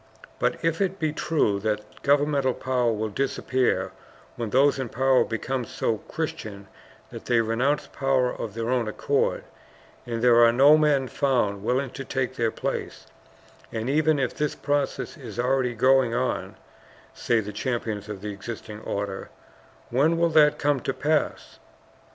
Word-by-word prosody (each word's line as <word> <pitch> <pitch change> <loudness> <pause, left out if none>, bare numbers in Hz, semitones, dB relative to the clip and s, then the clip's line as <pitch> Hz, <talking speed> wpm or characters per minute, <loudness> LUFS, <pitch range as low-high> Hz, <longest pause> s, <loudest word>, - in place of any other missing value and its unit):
"But - - +1
if 165 +2 +1
it 190 0 0
be 155 -4 -1
true 150 -11 +1
that 105 0 -4
governmental 140 -2 +2
power 125 -2 0
will 110 0 -2
disappear 130 -5 0 0.4
when 115 -2 -4
those 135 +4 +3
in 130 -3 -3
power 130 +2 +3
become 125 +3 -3
so 110 -1 -2
Christian 115 -12 -6 0.4
that - - -9
they 120 -1 +3
renounce 120 +6 +1
power 135 -2 0
of 110 -2 -6
their 115 +1 -2
own 125 -3 +1
accord, 105 - 0 0.6
and 115 -1 -3
there 120 -1 +6
are 115 - +6
no 140 +5 +7
men 150 -4 +2
found 120 -8 0
willing 130 +3 0
to 135 - -7
take 130 -1 -2
their 115 -2 +1
place, - - -4 0.7
and 115 +4 -2
even 155 +1 +3
if 130 -3 -1
this 150 -1 -2
process 145 -1 -2
is 120 -6 -9
already 125 0 +1
going 130 0 +3
on," 125 +1 -2 0.6
say 120 -1 +1
the 105 -1 -5
champions 110 -2 -3
of 100 -3 -6
the 105 0 -4
existing 105 +1 -8
order, 100 -2 -4 0.6
"when 150 +7 +3
will 170 0 +3
that 155 -2 +5
come 145 -1 +1
to 135 - -2
pass? 155 +1 -1
125 Hz, 155 wpm, -25 LUFS, 115-140 Hz, 0.7 s, no